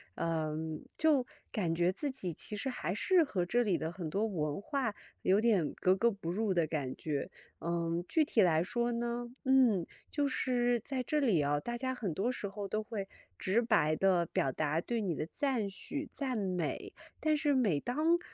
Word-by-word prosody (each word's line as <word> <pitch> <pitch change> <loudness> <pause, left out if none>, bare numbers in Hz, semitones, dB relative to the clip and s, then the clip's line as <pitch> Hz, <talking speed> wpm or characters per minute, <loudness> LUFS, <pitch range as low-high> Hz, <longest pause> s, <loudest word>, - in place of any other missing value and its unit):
嗯， 160 -1 -2
就 300 -5 +3 0.2
感 180 -8 0
觉 175 +2 +2
自 285 +8 -2
己 185 -10 -3
其 210 +6 -5
实 235 - -3
还 245 -8 -2
是 345 - +4
和 190 -11 -1
这 240 +7 +2
里 195 -6 +2
的 160 - -2
很 175 -2 -5
多 200 +7 0
文 155 -7 -2
化， 265 -3 -1 0.3
有 190 +2 +4
点 210 -9 +3
格 185 +1 +3
格 235 +4 +3
不 195 -5 -6
入 205 +2 0
的 170 -3 +2
感 145 -5 -2
觉， 150 +3 -3 0.3
嗯， 170 0 -1
具 320 - +4
体 235 - +3
来 165 -4 +4
说 240 +6 0
呢， 240 0 -2 0.2
嗯， 250 -9 +4 0.2
就 290 -1 +1
是 245 -2 +1
在 260 +3 -3
这 300 +4 0
里 215 - +3
啊， 145 0 +2
大 240 +9 -4
家 260 +1 -2
很 205 -9 -2
多 200 +9 0
时 215 - -4
候 200 0 -5
都 215 +2 -1
会 210 -3 -4 0.3
直 205 +6 +2
白 155 -10 +3
地 180 0 +3
表 135 - 0
达 155 +3 0
对 235 +5 -2
你 185 -6 -1
的 155 - -2
赞 260 -7 0
许、 285 +9 -4
赞 260 -4 -2
美， 185 -6 -2 0.3
但 310 -1 +2
是 295 -1 +2
每 205 - +3
当， 310 - +2
205 Hz, 210 characters per minute, -33 LUFS, 170-245 Hz, 0.3 s, 是